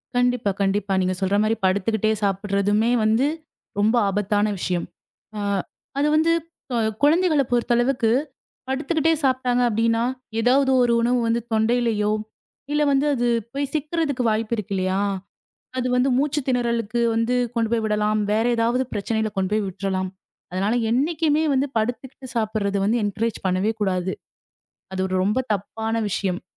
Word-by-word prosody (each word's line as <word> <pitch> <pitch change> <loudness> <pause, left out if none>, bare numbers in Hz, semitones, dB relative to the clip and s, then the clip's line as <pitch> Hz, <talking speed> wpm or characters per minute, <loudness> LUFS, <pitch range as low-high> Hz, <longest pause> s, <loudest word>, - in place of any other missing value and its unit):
கண்டிப்பா, 245 -4 +2
கண்டிப்பா. 195 0 0
நீங்கச் 185 +1 -1
சொல்ற 195 +2 +2
மாரி 220 +1 +1
படுத்துக்கிட்டே 215 +3 +1
சாப்பிடுறதுமே 205 +3 +1
வந்து 225 +6 +3 0.5
ரொம்ப 220 +4 +3
ஆபத்தான 205 +1 +1
விஷியம். 180 -1 -1 0.5
அ - - -3 0.6
அது 295 - +2
வந்து 325 +2 +3 0.4
கு - - 0 0.3
குழந்தைகளைப் 310 -4 +3
பொறுத்த 240 0 +2
அளவுக்கு 240 -2 +2 0.6
படுத்துக்கிட்டே 315 +4 +1
சாப்ட்டாங்க 255 -2 +2
அப்டின்னா, 230 +1 +1 0.4
ஏதாவது 265 +3 +3
ஒரு 235 -1 +2
உணவு 245 +1 +2
வந்து 230 +1 +1
தொண்டையிலயோ, 220 -2 +1 0.6
இல்ல 295 0 +2
வந்து 275 +2 +2
அது 245 0 0 0.3
போய் 280 0 -2
சிக்கிறதுக்கு 300 -3 -1
வாய்ப்பு 220 +2 0
இருக்கு 200 -1 -4
இல்லையா? 185 +1 0 0.8
அது 255 0 0
வந்து 255 +2 +3
மூச்சுத் 285 0 0
திணறலுக்கு 235 -2 0
வந்து 230 +2 +1 0.2
கொண்டு 225 -1 +1
போய் 225 -1 +1
விடலாம். 210 0 +1
வேற 220 +2 +2
ஏதாவது 235 +3 +2
பிரச்சனையில 220 +1 -1
கொண்டு 190 +1 0
போய் 215 -2 +1
விட்றலாம். 190 0 -2 0.4
அதனால 195 +5 0 0.2
என்னைக்குமே 310 +3 +1
வந்து 270 +2 +1
படுத்துக்கிட்டு 250 +4 -3
சாப்புறது 215 -3 0
வந்து 230 +3 +2
என்கரேஜ் 215 +2 -2
பண்ணவே 185 +4 +1
கூடாது. 185 -1 0 0.8
அது 190 - -3
ஒரு 185 - -3
ரொம்ப 210 +6 +1 0.2
தப்பான 220 +3 -4
விஷியம். 185 -1 -2
225 Hz, 140 wpm, -23 LUFS, 205-255 Hz, 0.8 s, வந்து